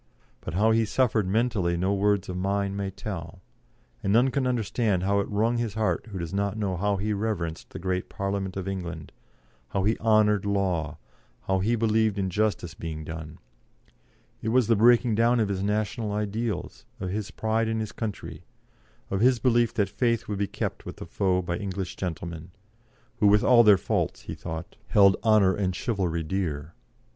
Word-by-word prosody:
But 85 - -5
how 110 +4 +4
he 115 0 +3
suffered 110 -2 +1
mentally 100 -5 +1
no 95 +3 +1
words 100 0 +1
of 90 - -4
mine 100 +1 -1
may 100 -1 -2
tell, 90 -3 -7 0.6
and 100 - 0
none 120 +5 +4
can 135 -2 0
understand 110 -5 0
how 100 +1 +2
it 100 - -2
wrung 110 +3 +1
his 115 -3 -2
heart 110 +1 0
who 100 -3 -7
does 85 -1 -5
not 100 +1 -1
know 100 -4 -1
how 100 +3 0
he 105 +2 -1
reverenced 100 -6 -3
the - - -8
great 90 +1 -2
Parliament 100 -1 -3
of 95 0 -4
England, 90 -5 -5 0.6
how 95 +6 -1
he 110 +3 +1
honoured 110 -2 +3
law, 95 -7 -1 0.5
how 95 +7 +1
he 110 +5 +1
believed 110 -2 +2
in 95 -2 -1
justice 105 -4 -1
being 80 -2 -6
done; 80 0 -7 1.0
it 110 - -2
was 125 +1 +4
the 115 +1 +3
breaking 120 +2 +5
down 115 +3 +3
of 105 -3 +1
his 95 -1 -2
national 105 +2 -1
ideals, 105 -2 -3 0.2
of 95 -1 -3
his 105 0 -3
pride 110 +2 0
in 110 0 -1
his 110 -1 -3
country, 110 -3 -6 0.7
of 95 +1 0
his 125 +1 +5
belief 120 0 +2
that 100 -2 +2
faith 115 +3 0
would 105 -2 -3
be 100 - 0
kept - - -4
with - - -9
a - - -6
foe 90 -2 0
by 85 0 -2
English 95 -3 -4
gentlemen, 85 -2 -5 0.7
who 105 - +5
with 105 +1 +5
all 120 -2 +7
their 105 -3 +7
faults, - - -1
he - - -7
thought, 85 0 -7
held 100 -2 +6
honour 105 -4 +5
and 95 -3 -1
chivalry 95 -8 -1
dear. 80 -3 -3
100 Hz, 185 wpm, -26 LUFS, 95-110 Hz, 1.0 s, all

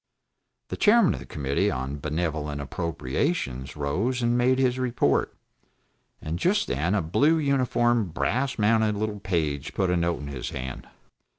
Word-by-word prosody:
The - - -4
Chairman 220 -2 +5
of - - -5
the - - -11
Committee 70 -2 0
on 65 +3 -3
Benevolent 75 -1 -2
Appropriations 70 - -2
rose 100 - -1
and 120 0 +2
made 125 +1 +3
his 130 -1 +1
report, 120 - +1 0.8
and 80 +2 -4
just 200 - +2
then 85 +9 0
a 95 - +1
blue 145 - +3
uniformed 120 - +1
brass 130 +10 -1
mounted 110 0 +3
little 105 0 -3
page 80 -8 -2
put 95 -2 +1
a - - +2
note 85 -2 0
into 70 0 -6
his 60 -3 -5
hand. 65 -1 -6
90 Hz, 155 wpm, -26 LUFS, -, 0.8 s, Chairman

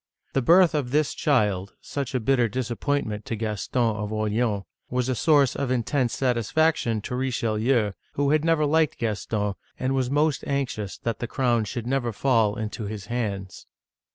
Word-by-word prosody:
The 135 - +2
birth 170 +6 +6
of 145 -5 -1
this 150 +2 +1
child 105 -9 +1
— - - -48
such 140 -2 -4
a - - +2
bitter 125 0 +2
disappointment 120 -1 -2
to 115 - -3
Gaston 110 +1 -1
of 105 0 -4
Or 110 0 -1
leans 105 -2 0
— - - -49
was 125 0 0
a - - +2
source 145 -1 +3
of 140 - -2
intense 125 0 0
satisfaction 125 -1 +1
to 125 - -4
Richelieu, 115 -3 +1 0.2
who 140 0 +1
had 155 0 +3
never 165 -2 +3
liked 155 +1 +2
Gaston, 105 -2 -1 0.2
and 130 +1 -1
was 130 -2 0
most 145 -1 +1
anxious 130 -8 -2
that 115 -2 -3
the 120 - -3
crown 120 -4 +1
should 115 +3 -5
never 125 -2 0
fall 115 -3 +2
into 110 0 -4
his 100 -1 -6
hands. 100 -6 -4
120 Hz, 180 wpm, -25 LUFS, 110-140 Hz, 0.2 s, birth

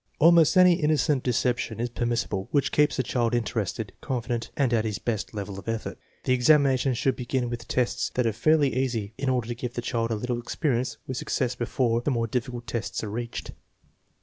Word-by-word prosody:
Almost 165 +1 +6
any 180 -1 +6
innocent 150 -2 +2
deception 120 -2 0
is 120 +1 -1
permissible 115 -5 -1
which 140 -2 +1
keeps 150 0 +3
the 130 - +1
child 120 0 0
interested, 110 -3 -2
confident, 120 -3 -3
and 135 -5 +2
at 110 -2 +2
his 105 -3 -2
best 110 +1 -3
level 100 -1 -5
of - - -13
effort. 115 -1 -4 0.2
The 130 - +2
examination 135 0 +4
should 130 +3 +1
begin 125 -1 -2
with 115 -1 -6
tests 120 -1 0
that 125 - +1
are 115 - +1
fairly 145 +4 +3
easy, 115 -5 -1
in 135 -1 0
order 125 -3 0
to - - -1
give 120 0 -6
the 120 - -2
child 115 -1 -1
a 115 - 0
little 120 +2 -2
experience 125 -2 -1
with 130 - -4
success 125 -1 -1
before 120 -1 0
the 135 - -1
more 115 -4 +1
difficult 120 +1 -3
tests 115 -1 -3
are 105 - -4
reached. 120 +2 -5
120 Hz, 200 wpm, -26 LUFS, 115-130 Hz, 0.2 s, Almost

